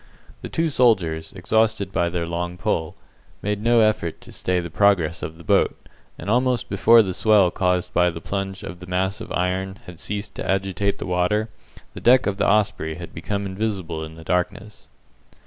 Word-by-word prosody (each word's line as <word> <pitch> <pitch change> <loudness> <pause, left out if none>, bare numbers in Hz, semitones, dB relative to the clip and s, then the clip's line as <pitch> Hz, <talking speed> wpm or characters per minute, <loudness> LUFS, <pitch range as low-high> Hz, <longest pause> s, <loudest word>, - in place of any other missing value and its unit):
The - - -6
two 165 0 0
soldiers, 95 - +2
exhausted 105 +1 +1
by 85 -3 +1
their 85 -1 -2
long 85 +1 -3
pull, 90 -4 -1 0.5
made 105 0 -1
no 115 +1 +4
effort 110 -7 +1
to - - -13
stay 90 -1 -1
the 85 -2 -6
progress 90 -4 +2
of 80 - -6
the 85 - -13
boat, - - +2 0.4
and - - -9
almost 125 +2 +1
before 115 +3 +6
the 95 -2 -3
swell 100 -2 +4
caused 90 0 0
by 90 0 +4
the 85 -1 -6
plunge 95 +3 -4
of 85 +2 -7
the 90 - -11
mass 95 +3 -1
of 110 - -8
iron 95 +1 -1
had 90 -2 -11
ceased 105 -1 -4
to - - -4
agitate 95 +1 0
the - - -6
water, 90 +5 0 0.4
the - - -9
deck 125 +2 +5
of 100 -1 -1
the - - +1
Osprey 100 -6 +1
had 85 +1 -9
become 100 +5 -3
invisible 95 -5 -3
in 80 0 -9
the 80 - -11
darkness. 90 +5 -3
95 Hz, 190 wpm, -23 LUFS, 85-105 Hz, 0.5 s, before